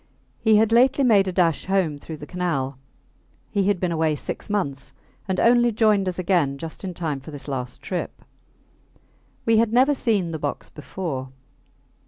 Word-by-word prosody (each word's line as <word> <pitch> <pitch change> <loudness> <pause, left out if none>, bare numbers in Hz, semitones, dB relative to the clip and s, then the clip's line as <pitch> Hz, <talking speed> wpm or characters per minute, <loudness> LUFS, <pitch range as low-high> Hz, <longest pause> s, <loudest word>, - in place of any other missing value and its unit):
He 220 -2 +4
had 220 +1 +4
lately 255 +4 +4
made 205 -6 +4
a - - 0
dash 175 -3 +1
home 185 -7 0
through 160 +2 -8
the 150 - -9
Canal. 145 -7 -2 0.7
He 200 -2 +1
had 205 -3 +2
been 180 -1 -1
away 160 -2 +1
six 145 - -6
months, 140 -10 -2 0.3
and 190 -1 -1
only 240 0 +4
joined 210 -3 +2
us 180 - -2
again 170 -7 +1
just 160 +5 -8
in 185 -2 -5
time 155 -5 -3
for 135 - -12
this 145 -2 -9
last 125 -3 -5
trip. 180 - -5 1.2
We 225 -1 +4
had 225 0 +3
never 260 +5 +4
seen 210 -10 0
the 160 - -4
box 145 -1 -4
before. 150 -4 -5
180 Hz, 175 wpm, -23 LUFS, 150-215 Hz, 1.2 s, He